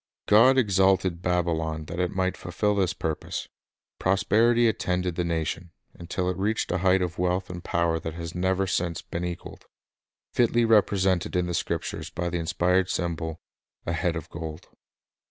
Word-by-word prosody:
God 120 +6 +6
exalted 95 -5 +3
Babylon 80 -3 -1
that 85 +3 -6
it 90 -1 +1
might 95 +1 -1
fulfil 105 +4 -1
this 95 -3 +1
pur 80 -2 -2
pose. - - -6 0.5
Prosperity 110 +5 +3
attended 90 -4 0
the 90 - -1
nation, 85 +1 -2 0.2
until 90 +1 -3
it 90 -1 -1
reached 105 +4 0
Babylon 90 +1 -1
a - - +3
height 95 +1 +4
of 85 -1 -4
wealth 90 +1 0
and 90 0 -7
power 85 -1 0
that 80 0 -6
has 85 0 -6
never 95 +2 +1
since 85 -3 -1
been 85 - -5
equaled, 90 -1 -7 0.3
— - - -68
fitly 120 -1 +3
represented 95 -5 +2
in 90 -1 +2
the 90 - -3
Scriptures - - -3
by 85 0 -3
the 85 - -1
inspired 90 +2 +1
symbol, 80 -2 -2 0.5
a 85 - -1
"head 85 +1 0
of 80 - -5
gold." 80 0 -7
90 Hz, 175 wpm, -26 LUFS, 85-95 Hz, 0.5 s, God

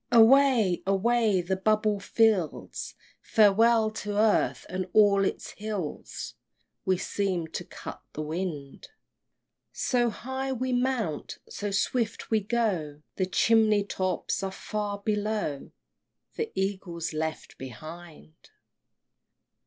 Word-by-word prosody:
III. - - +2
Away! 235 -6 +5
away! 210 0 +2
the 185 +2 -1
bubble 215 +1 +1
fills 200 -4 0 0.3
Farewell 220 +1 +4
to 210 -1 -4
earth 215 0 +2
and 185 0 -3
all 200 -2 +5
its - - -2
hills! 205 -7 -5 0.5
We 185 -1 +2
seem 185 -3 -1
to - - -5
cut - - -9
the 155 - -4
wind! 155 -3 -5 0.8
So 240 -2 +1
high 265 +4 -4
we 255 +1 -2
mount, 245 - -1
so 205 - -4
swift 225 +4 -1
we 220 - +4
go, 195 -10 -1
The 185 - +1
chimney 215 +1 +4
tops 185 -2 -2
are 195 -1 -2
far 205 +1 -4
below, 205 -7 -2 0.7
The 455 0 -3
Eagle's 190 -4 -3
left 160 0 -4
behind! 155 +6 -10
205 Hz, 115 wpm, -28 LUFS, 180-225 Hz, 0.8 s, Away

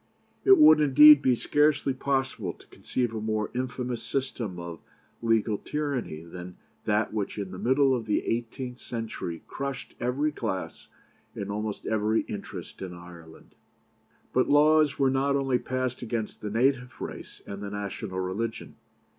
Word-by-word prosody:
"It 390 -1 +7
would, 155 - +8
indeed, 150 +1 +9
be 130 -3 +3
scarcely 145 +1 +2
possible 130 -8 -1
to - - -19
conceive 120 -3 -2
a 110 - -3
more 110 -1 -1
infamous 125 -1 -3
system 125 -9 -3
of 85 -1 -7 0.4
legal 115 -2 +1
tyranny 140 - -3
than 90 +1 -9 0.3
that 105 +1 +1
which 105 -1 -3
in 100 -3 -4
the 95 - -7
middle 135 +2 +3
of 120 -3 -2
the 105 - 0
eighteenth 120 +2 -3
century 110 -8 -5
crushed 140 -1 -5
every 135 +5 0
class 110 -9 -4 0.5
and 100 0 -4
almost 105 0 -4
every 110 0 +1
interest - - -8
in 90 -2 -6
Ireland." 85 -2 -13 0.8
But 130 - +2
laws 150 0 +5
were 135 -1 +3
not 140 +1 +1
only 135 -3 +1
passed 130 -1 -3
against 115 -2 -4
the 105 - -4
native 125 +3 +1
race - - -8
and 100 0 -7
the 100 - -4
national 100 -1 -5
religion. 100 +5 -4
120 Hz, 150 wpm, -27 LUFS, 105-135 Hz, 0.8 s, indeed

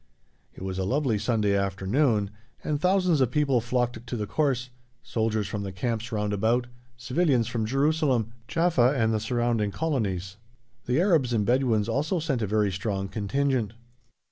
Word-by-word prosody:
It - - -9
was 95 0 -3
a - - 0
lovely 125 +1 0
sunny 105 -2 +1
afternoon, 100 +3 +1 0.3
and 150 -1 -2
thousands 185 -4 +3
of 130 - +3
people 135 -2 +2
flocked 120 -1 -2
to 120 - -3
the 105 - -2
course, 130 -1 -1 0.3
soldiers 110 -2 -1
from 100 +1 -4
the 100 -1 -4
camps 115 +4 -3
round 105 -2 -1
about, 115 +4 +1 0.3
civilians 130 0 +1
from 115 -1 -2
Jerusalem, 135 - +1 0.2
Jaffa, 160 -6 +2
and 110 -2 +2
the 110 - +1
surrounding 115 -1 0
colonies; 100 - -2 0.5
the 125 +4 +2
Arabs 165 -10 +3
and 105 -3 +1
Bedouins 120 -4 +2
also 145 +10 0
sent 145 -6 -1
a 105 - 0
very 105 -1 +1
strong 95 0 -3
contingent. 115 +1 -1
120 Hz, 160 wpm, -26 LUFS, 105-135 Hz, 0.5 s, thousands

